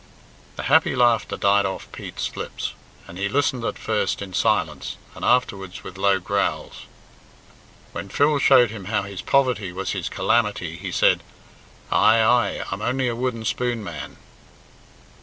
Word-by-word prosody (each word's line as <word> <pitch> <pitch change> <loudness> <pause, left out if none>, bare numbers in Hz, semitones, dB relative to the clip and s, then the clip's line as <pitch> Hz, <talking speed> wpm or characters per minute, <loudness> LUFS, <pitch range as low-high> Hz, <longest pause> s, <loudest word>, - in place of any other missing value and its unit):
The - - -5
happy - - +3
laughter 120 -5 +2
died 100 +1 +3
off 95 - -6
Pete's, - - -6
lips, - - -5 0.3
and 85 - -10
he 100 +1 0
listened 130 -1 0
at - - -2
first - - -1
in 95 -2 -7
silence, 80 -10 0 0.2
and - - -10
afterwards 100 -7 0
with 95 - -9
low 100 0 +3
growls. 100 +2 -2 1.1
When 100 - -6
Phil 145 +6 +2
showed 125 -4 +5
him 105 -4 -8
how 105 0 0
his 100 -2 -7
poverty 125 -9 +1
was 95 +2 -3
his - - -3
calamity 105 -8 0
he 95 +2 -6
said, - - +3 0.7
"Ay, 110 +1 +5
ay, 120 +2 +2
I'm 95 +2 -4
only 125 +2 0
a 120 - -2
wooden 120 -2 -3
spoon 120 -1 -1
man." 85 -7 -7
105 Hz, 155 wpm, -23 LUFS, 95-120 Hz, 1.1 s, showed